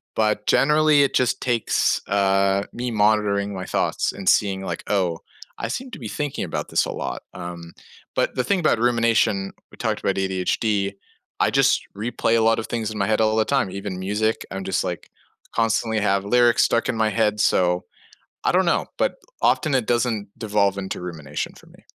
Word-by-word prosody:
but, 105 -1 +1
generally, 150 0 +4
it 140 - 0
just 125 0 +2
takes, 120 -3 +1
uh, 100 0 +2
me 125 0 -3
monitoring 105 -2 +2
my 95 -1 -5
thoughts - - 0
and 95 -2 -8
seeing 95 -2 +2
like, - - -4
"Oh, 90 -5 0 0.4
I - - -2
seem 255 - -4
to 225 - -8
be 115 - -6
thinking 145 +3 -3
about - - -4
this - - +2
a - - -4
lot, - - -4
um" 85 -1 -8 0.4
But - - 0
the 125 - +1
thing 200 +5 +1
about 155 -8 +2
rumination, 115 -5 +2 0.2
we - - -15
talked - - -2
about 100 - 0
ADHD, 100 +2 0 0.5
I - - +3
just - - +3
replay 115 +2 0
a - - +2
lot 115 0 +3
of 110 - -5
things 110 -2 -3
in 110 - -6
my 100 - 0
head 110 0 +2
all 110 0 +2
the 110 - +3
time, 130 -6 0
even 100 -1 -5
music, 105 +4 -1
I'm 95 0 -4
just, 95 0 0
like, 90 -3 -5 0.5
constantly 115 -1 +1
have 100 -1 +1
lyrics 120 +2 +4
stuck 115 - +1
in 115 - -1
my 110 0 +2
head, 105 0 +1
so, 90 -3 +2 0.6
I - - +3
don't 185 +1 +3
know, 170 - +2
but - - +1 0.3
often, 155 - +2
it 125 -4 0
doesn't 120 -3 0
devolve 100 -2 +1
into 95 -2 -4
rumination 80 -5 -5
for - - -17
me. - - -20
105 Hz, 195 wpm, -23 LUFS, 95-115 Hz, 0.6 s, generally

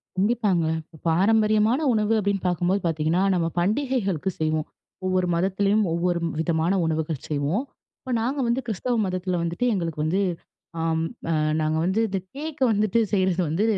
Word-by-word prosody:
கண்டிப்பாங்க. 200 -4 +1 0.2
இப்ப 160 0 -18
பாரம்பரியமான 215 - +3
உணவு 215 0 +1
அப்பிடின்னு 200 -2 -1
பார்க்கும்போது 180 +3 +1
பார்த்தீங்கன்னா, 165 +3 +1
நம்ம 170 -2 +1
பண்டிகைகளுக்கு 200 - 0
செய்வோம். 155 -1 0 0.4
ஒவ்வொரு 185 -1 +1
மதத்திலேயும், 195 +4 +2
ஒவ்வொரு 175 +1 0 0.2
விதமான 165 +2 +1
உணவுகள் 160 -2 -2
செய்வோம். 150 - 0 0.4
இப்ப 260 - -7
நாங்க 260 +5 -1
வந்து 235 +2 +1
கிறிஸ்தவ 240 +4 -1
மதத்தில 185 -1 -2
வந்துட்டு 170 +9 -1
எங்களுக்கு 165 -4 -2
வந்து 180 +5 +1 0.6
ஆம் 160 0 0 0.3
அ - - +2 0.3
நாங்க 155 0 0
வந்து 190 +5 +1
இந்த 195 -2 -2 0.2
கேக் 295 -1 -6
வந்துட்டு 215 +1 +2
செய்றது 185 -3 +1
வந்து 165 +7 0
185 Hz, 145 wpm, -24 LUFS, 165-215 Hz, 0.6 s, பாரம்பரியமான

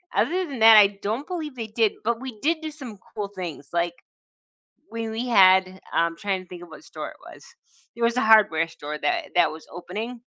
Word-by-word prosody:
other 365 +3 +1
than 270 -6 -7
that, 220 0 +8
I 200 -1 +5
don't 225 +8 -2
believe 315 -7 -5
they 225 -2 -5
did, 220 -1 +1
but 230 +1 -1
we 255 -5 -7
did 320 +4 +1
do 315 - -4
some 260 -8 -10 0.2
cool 205 -2 -4
things, 175 -8 -8
like, 170 0 0 1.0
we 230 -1 -4
we 230 +3 -4
had 190 -3 +5
I'm 165 0 +1
trying 195 -2 -2
to - - -22
think 175 -1 -10
of 175 - -13
what 160 - -13
store - - -7
it - - -15 0.2
was. - - -16 0.5
It 235 - -10
was 235 +1 +1
a - - +3
hardware 205 -8 +5
store 150 -1 -7
that 345 -3 -1
that 175 - +4
was 160 0 -11
opening. 225 +7 -7
215 Hz, 215 wpm, -24 LUFS, 185-245 Hz, 1.0 s, that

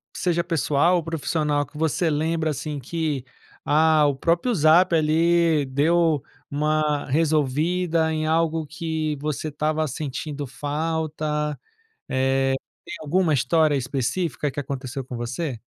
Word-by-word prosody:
seja 175 -2 +1
pessoal 165 +1 +2
ou 170 - 0
profissional, 150 -2 -1
que 150 - -14
você 160 +2 +1
lembra 155 +1 0
assim 150 0 -4
que, 150 -1 -3 0.4
ah, 155 0 +4
o 140 - 0
próprio 170 - +1
Zap 170 +2 +5
ali 160 -1 +3
deu 155 +2 +2 0.3
uma 150 0 0
resolvida 160 +3 +1
em 155 0 -1
algo 160 0 +1
que 155 -1 -3
você 150 +1 -3
estava 155 +1 -1
sentindo 145 +1 -5
falta, 150 +1 -2 0.5
eh, 135 0 +1 0.3
tem - - -7
alguma 160 +2 +1
história 150 +3 +3
específica 140 +4 -1
que 145 - -4
aconteceu 135 -1 -5
com 125 -1 -7
você? 120 +3 -4
155 Hz, 125 wpm, -24 LUFS, 145-165 Hz, 0.5 s, Zap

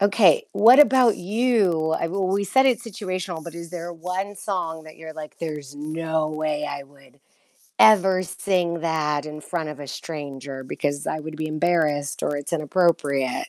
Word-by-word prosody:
Okay. 200 -4 +4
What 225 +7 +7
about 255 -6 +5
you? 195 -6 +1
I - - -6
w 185 +4 -2
we 195 +2 0
said 265 +7 +3
it's 245 -2 +1
situational, 185 -5 -5
but 170 +1 -9
is 170 -1 -8
there 175 -1 -6
one 180 +4 -4
song 175 -5 -3
that 155 - -13
you're 160 0 -9
like, 155 -1 -10
"There's 150 -4 -6
no 160 +1 -2
way 155 -1 -2
I 140 -1 -5
would 140 0 -22 0.6
ever 190 -3 +6
sing 175 -2 -1
that 155 -3 -1
in 150 0 -7
front 160 -1 -4
of 145 -1 -9
a 145 - -7
stranger 140 -4 -7
because 145 +2 -3
I 155 - -1
would 155 0 -7
be 155 0 -3
embarrassed 155 -3 0
or 145 - 0
it's 145 +3 -6
inappropriate?" 150 -5 +1
160 Hz, 175 wpm, -23 LUFS, 150-185 Hz, 0.6 s, What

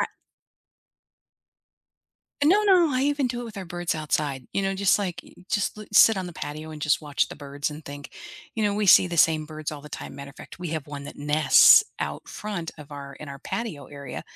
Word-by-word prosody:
I - - +1 2.4
No, 390 +8 +5
no, 360 -6 +5
I 255 +1 +1
even 285 -2 +1
do 240 0 -3
it - - -5
with 220 -3 -10
our 190 - -5
birds 175 0 -3
outside. 150 -3 -2
You 195 - 0
know, 195 0 0
just 200 +1 +3
like 175 -3 -4
you - - -18 0.2
just 205 0 0
loo 215 - -9
sit 220 +1 +7
on 185 -1 -3
the 175 - -8
patio 155 +1 -7
and 150 -2 -9
just 150 - +2
watch 150 -2 -1
the - - -9
birds 145 0 -4
and 150 +2 -9
think. 145 0 -9 0.4
You 220 - -1
know, 205 -1 +1
we 210 -1 0
see 180 - +7
the 175 -1 -4
same 155 -1 +3
birds 155 -1 -6
all 145 - -7
the 150 - -12
time, - - -8
matter 140 0 -9
of - - -21
fact, - - -12
we 175 -2 -5
have 155 -3 -4
one 145 -1 -7
that - - -9
nests 150 - +6
out - - -5
front 195 -6 -5
of 150 -1 -12
our 140 -1 -8
in 150 - -10
our 140 0 -8
patio 195 -5 -5
area, 140 -1 -8
160 Hz, 230 wpm, -25 LUFS, 145-205 Hz, 2.4 s, sit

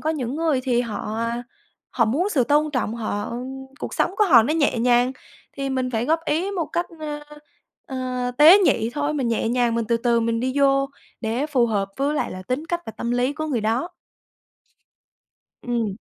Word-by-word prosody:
có 315 - 0
những 265 -4 -3
người 315 -5 +1
thì 245 -2 +1
họ, 215 -2 -4
a, 235 +1 -2 0.5
họ 235 - +2
muốn 300 - +1
sự 265 -9 +2
tôn 295 +4 +2
trọng, 250 -5 -1
họ 215 -1 -3 0.5
cuộc - - -5
sống 375 - 0
của 425 - +4
họ 250 - +7
nó 300 +7 0
nhẹ 285 -6 +2
nhàng 245 +2 +3 0.4
thì 275 -1 -3
mình 255 -1 -1
phải 230 0 -1
góp 325 +1 +2
ý 345 +7 0
một 355 -5 -2
cách, 345 +1 -2
ơ, 295 -1 -4 0.7
ờ, 255 -1 -3
tế 330 +7 +9
nhị 235 - +2
thôi, 295 +1 -1
mình 260 -5 -1
nhẹ 225 0 0
nhàng, 240 -1 +1
mình 230 -1 0
từ 235 - +3
từ 235 0 +2
mình 230 0 0
đi 255 +1 -1
vô 275 0 +3 0.3
để 240 +6 -1
phù 255 -6 +2
hợp 200 -3 -1
với 285 +2 0
lại - - -1
là 185 0 -7
tính 255 - -3
cách 345 0 -2
và 225 - -6
tâm 235 - -3
lý 245 +3 +1
của 310 +1 -4
người 255 -7 -1
đó. 230 +10 0 1.7
Ừm. 230 -5 -2
255 Hz, 205 wpm, -23 LUFS, 235-295 Hz, 1.7 s, tế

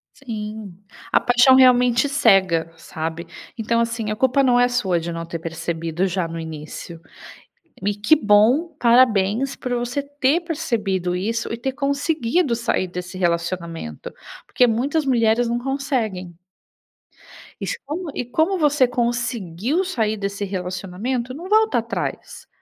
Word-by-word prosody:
Sim, 215 -6 -7 0.3
a - - +5
paixão 245 +2 +5
realmente 250 0 +5
cega, 190 - +3
sabe. 165 +1 -5 0.3
Então, 230 +1 0
assim, 230 -2 -1
a - - -1
culpa 260 +4 +2
não 245 -2 +4
é 245 - +5
sua 210 -8 0
de 170 +1 -5
não 165 0 -5
ter 165 0 -6
percebido 165 +2 -3
já 180 -2 -1
no 165 0 -6
início. 160 +1 -8 0.9
E 205 +1 +1
que 210 +10 +4
bom, 245 +8 +3
parabéns, 235 0 +3
por 250 - -5
você 245 +3 -2
ter 285 +2 +1
percebido 220 - -2
isso, 225 +7 -2
e - - -2
ter 265 +3 -3
conseguido 280 0 0
sair 230 -5 -1
desse 180 +1 -7
relacionamento, 170 - -3 0.3
porque 250 - +3
muitas 270 +7 0
mulheres 235 -2 +2
não 235 +1 0
conseguem. 240 - -3 1.3
E - - -3
se - - -2
como 320 +4 -4
e - - -2
como 315 +10 0
você 295 -5 +3
conseguiu 240 - -1
sair 225 - -1
desse 200 0 -3
relacionamento, 195 +7 -4
não 340 +7 -8
volta 440 +1 +3
atrás. - - -5
230 Hz, 140 wpm, -21 LUFS, 185-265 Hz, 1.3 s, a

